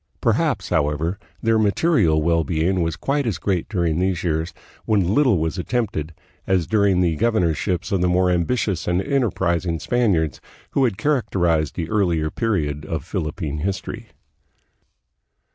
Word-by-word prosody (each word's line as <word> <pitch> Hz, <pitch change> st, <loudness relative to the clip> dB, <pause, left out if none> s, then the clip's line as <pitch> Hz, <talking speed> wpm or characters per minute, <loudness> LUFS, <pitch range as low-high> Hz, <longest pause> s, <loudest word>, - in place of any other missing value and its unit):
Perhaps, -, -, 0 dB
however, 75 Hz, +6 st, 0 dB, 0.2 s
then* 115 Hz, -1 st, +3 dB
material 100 Hz, -, +2 dB
well 85 Hz, 0 st, +2 dB
being 85 Hz, +3 st, 0 dB
was 80 Hz, -2 st, -1 dB
quite 140 Hz, -1 st, -1 dB
as 105 Hz, -, -1 dB
great 95 Hz, -4 st, -1 dB
during 85 Hz, -5 st, 0 dB
these 90 Hz, -2 st, 0 dB
years, 80 Hz, 0 st, -1 dB, 0.3 s
when 100 Hz, -3 st, +2 dB
little 130 Hz, -6 st, +4 dB
was 80 Hz, +3 st, -2 dB
attempted, 90 Hz, -, -2 dB, 0.3 s
as 95 Hz, -3 st, +2 dB
during 100 Hz, -3 st, +2 dB
the 85 Hz, -3 st, +2 dB
governorships 90 Hz, -2 st, 0 dB
of 95 Hz, -3 st, +1 dB
the 90 Hz, -, +3 dB
more 90 Hz, +1 st, +3 dB
ambi 85 Hz, -2 st, +1 dB
tious 105 Hz, -9 st, -1 dB
and 90 Hz, 0 st, +2 dB
enterprising 95 Hz, -, 0 dB
Spaniards 85 Hz, -, 0 dB, 0.3 s
who 135 Hz, -, +2 dB
had 110 Hz, -6 st, -1 dB
characterized 85 Hz, -, +1 dB
the 85 Hz, -3 st, -3 dB
earlier 85 Hz, -7 st, +1 dB
period 75 Hz, -10 st, -1 dB
of 75 Hz, -2 st, -4 dB
Philippine 75 Hz, -1 st, -3 dB
history. 95 Hz, +3 st, -4 dB
90 Hz, 145 wpm, -22 LUFS, 80-105 Hz, 0.3 s, little